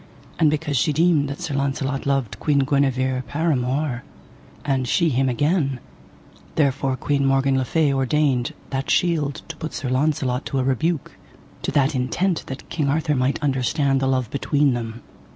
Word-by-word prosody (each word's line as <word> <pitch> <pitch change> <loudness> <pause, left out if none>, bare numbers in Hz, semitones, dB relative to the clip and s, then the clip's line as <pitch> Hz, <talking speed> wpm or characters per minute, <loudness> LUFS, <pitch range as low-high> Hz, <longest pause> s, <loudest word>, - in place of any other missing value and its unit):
And 160 -3 +5
because 150 -2 -1
she 150 - +2
deemed 155 -2 +3
that 140 +5 -6
Sir 165 -5 -3
Launcelot 135 0 -1
loved 135 -6 -1
Queen 140 -3 +2
Guenever 130 -2 +1
paramour, 140 -3 0 0.6
and 135 -3 0
she 170 +5 +2
him 135 -1 +1
again, 140 0 +1 0.8
therefore 135 -3 +1
Queen 140 0 0
Morgan 135 0 +2
le 130 - +2
Fay 145 +2 +1
ordained 135 -1 +1 0.2
that 135 0 -2
shield 155 -6 +1
to - - -7
put 160 -1 -5
Sir 130 - -3
Launcelot 135 -2 0
to 135 - -2
a 130 - +2
rebuke, 140 +4 -1 0.4
to - - -2
that 140 0 +3
intent 145 +8 -1
that 135 - -7
King 150 -4 -1
Arthur 155 +1 +1
might 130 0 +1
understand 135 0 +1
the 135 - 0
love 130 -3 0
between 140 0 +2
them. 115 -1 -5
140 Hz, 165 wpm, -22 LUFS, 130-150 Hz, 0.8 s, And